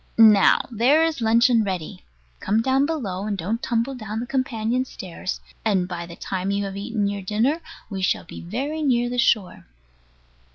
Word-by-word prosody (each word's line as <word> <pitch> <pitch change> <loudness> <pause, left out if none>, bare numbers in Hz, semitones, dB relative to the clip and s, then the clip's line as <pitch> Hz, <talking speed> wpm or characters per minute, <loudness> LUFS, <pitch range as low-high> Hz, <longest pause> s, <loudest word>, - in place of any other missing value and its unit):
Now 215 -3 +7
there 255 +8 +4
is 320 -5 -1
luncheon 230 +1 +4
ready. 175 - -4 0.4
Come 220 +3 +1
down 270 +2 +2
below, 205 - -3
and 205 -2 -2
don't 210 +7 -2
tumble 235 +3 -1
down 215 -3 -5
the 240 - -3
companion 245 -2 -1
stairs; 185 -6 -6 0.2
and 195 -5 +1
by 170 -1 -5
the 170 - -10
time 190 +1 -3
you 200 0 0
have 195 -1 -5
eaten 205 +1 -2
your 200 0 -2
dinner 225 - 0 0.3
we 195 -3 -5
shall 185 - +1
be - - -10
very 275 - -3
near 245 -4 +1
the 245 - -1
shore. 215 -5 +1
220 Hz, 175 wpm, -23 LUFS, 195-245 Hz, 0.4 s, Now